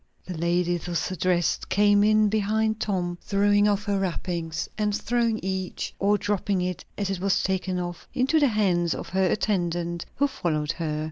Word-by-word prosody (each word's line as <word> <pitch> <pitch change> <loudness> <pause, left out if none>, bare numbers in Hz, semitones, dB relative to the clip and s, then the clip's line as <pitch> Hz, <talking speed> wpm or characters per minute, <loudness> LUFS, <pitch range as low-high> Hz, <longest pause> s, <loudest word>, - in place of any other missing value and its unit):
The 180 - -5
lady 175 +1 +1
thus 175 +1 -3
addressed 180 -3 0
came 205 0 +4
in 215 0 +4
behind 220 +1 +1
Tom, 175 -3 -2
throwing 205 +1 +3
off 205 0 +1
her 200 -1 0
wrappings, 170 -3 -3
and 210 -1 0
throwing 235 0 0
each, 190 -1 -3
or 205 +1 +3
dropping 205 -1 -1
it 180 0 -3
as 200 -1 -1
it 190 - -2
was 195 +1 +1
taken 190 -1 -1
off, 175 -1 -6
into 270 +5 +2
the 290 - +4
hands 185 -7 +1
of - - -7
her 190 0 +2
attendant 175 -4 -1
who 285 - +2
followed 155 - -1
her. 160 -3 -3
190 Hz, 175 wpm, -25 LUFS, 175-210 Hz, -, came